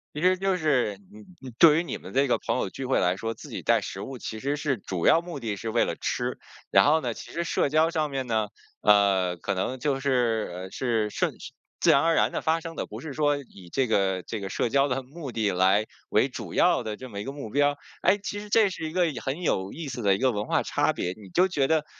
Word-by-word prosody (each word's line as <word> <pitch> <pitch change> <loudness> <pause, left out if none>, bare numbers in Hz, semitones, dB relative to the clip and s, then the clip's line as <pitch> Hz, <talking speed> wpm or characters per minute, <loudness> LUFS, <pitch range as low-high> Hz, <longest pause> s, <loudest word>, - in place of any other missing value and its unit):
其 150 - -4
实 185 +1 +4
就 195 -1 +1
是 125 - +1
你 105 0 -13 0.2
你 130 - -8
对 160 -1 +7
于 - - -1
你 - - -5
们 95 - -11
这 135 +1 +3
个 120 - +2
朋 - - -2
友 - - -1
聚 135 +7 -6
会 130 - +2
来 90 +1 +1
说， 115 +1 -3
自 - - -12
己 - - -6
带 - - +3
食 - - -6
物 130 -2 -7
其 110 -1 -6
实 140 +4 -1
是 145 -4 -1
主 95 -3 -2
要 165 - +6
目 170 -5 -7
的 110 -4 -3
是 110 +4 -5
为 - - +3
了 - - -3
吃。 - - -2 0.3
然 - - +5
后 155 +2 +4
呢， 120 -3 -3
其 - - -10
实 170 - -2
社 160 - +1
交 155 +3 +3
上 155 -3 -1
面 135 -2 -3
呢， 110 -2 0 0.3
呃， 100 -4 +4
可 100 -1 -3
能 125 +7 -2
就 140 -1 0
是， 120 -7 +1
呃， 95 +1 -7
是 115 -4 0
顺 - - -1 0.5
自 - - +3
然 140 - +6
而 165 0 +3
然 - - +3
地 - - -3
发 160 +1 +2
生 165 0 -8
的， - - -3
不 - - -9
是 150 -4 -6
说 145 -1 +2
以 100 -10 -12
这 135 -2 +1
个 95 -4 +1
这 110 +5 -5
个 95 -1 -5
社 120 - -1
交 140 +3 +3
的 130 0 -1
目 140 +1 -8
的 110 -3 0
来 95 +4 +3 0.2
为 - - +3
主 - - -7
要 - - +3
的 110 -1 -4
这 130 +2 -10
么 100 - -6
一 105 - -4
个 135 - -5
目 140 -6 -7
标。 145 +3 +2 0.3
哎， 195 +3 +4
其 205 +1 -5
实 210 0 -9
这 220 -3 +5
是 165 -4 -5
一 155 - -7
个 180 -1 +3
很 135 +6 -4
有 95 - -1
意 160 -1 -6
思 120 -2 -5
的 100 -1 +4
一 - - -1
个 130 -1 +3
文 105 -1 -3
化 - - +1
差 - - +1
别， 90 +1 -3
你 100 -3 -13
就 185 - +3
觉 140 -5 +1
得， 160 -2 +2
130 Hz, 290 characters per minute, -26 LUFS, 105-155 Hz, 0.5 s, 对